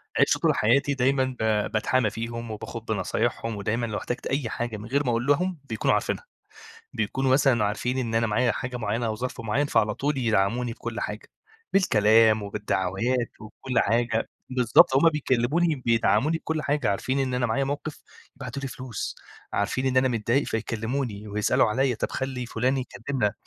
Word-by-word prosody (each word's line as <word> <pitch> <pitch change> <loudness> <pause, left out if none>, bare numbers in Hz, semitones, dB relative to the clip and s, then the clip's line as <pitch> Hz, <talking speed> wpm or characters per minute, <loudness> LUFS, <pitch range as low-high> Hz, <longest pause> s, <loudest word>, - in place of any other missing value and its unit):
عِشت - - +4
طول - - +2
حياتي 140 +6 +3
دايمًا 130 0 +1
ب 110 -2 +1
باتحامى 110 +1 +1
فيهم 115 +1 -5
وباخد 105 - -7
بنصايحهم، 115 -1 -1
ودايمًا 110 +4 -1
لو 110 -2 -3
احتجت 125 - -4
أي 135 -4 -1
حاجة 120 -2 -3
من 105 - -8
غير 140 +4 0
ما - - +1
أقول 120 0 0
لهم 170 +5 +1
بيكونوا 110 - +1
عارفينها، - - -1 0.7
بيكونوا 135 0 0
مثلًا 130 -5 +4
عارفين 120 +5 -1
إن 115 -3 -1
أنا 115 0 +2
معايا 115 +3 +2
حاجة 125 0 -4
معينة 115 +1 -1
أو 110 -1 -1
ظرف 125 +1 -4
معين 115 +6 0
فعلى 110 -6 +2
طول 145 0 -1
يدعموني 115 0 +1
بكل 115 0 -6
حاجة، 105 +1 -5 0.4
بالكلام 110 - +4
وبالدعوات 100 +4 -1
وبكل 120 +3 -3
حاجة، 115 +1 +1 0.2
بالضبط، 130 0 +4
هُم 165 +5 +6
بيكلموني 150 +3 +1
بيدعموني 130 +5 +2
بكل 160 -1 -3
حاجة 145 -6 0
عارفين 130 +7 -1
إن 130 -1 0
أنا 125 -1 +1
معايا 120 +4 0
موقف، 145 +2 -4 0.3
يبعتوا 140 - -6
لي 135 - -3
فلوس، 125 -3 -5 0.4
عارفين 105 +6 0
إن 130 -1 +2
أنا 130 0 +4
متضايق 120 +3 +1
فيكلموني 115 -1 -3
ويسألوا 105 +2 +2
عليا، 130 +2 +1
طب - - -2
خلّي 130 -2 -3
فُلان 125 +3 0
يكلّمنا. 125 -3 -2
120 Hz, 170 wpm, -26 LUFS, 110-135 Hz, 0.7 s, هُم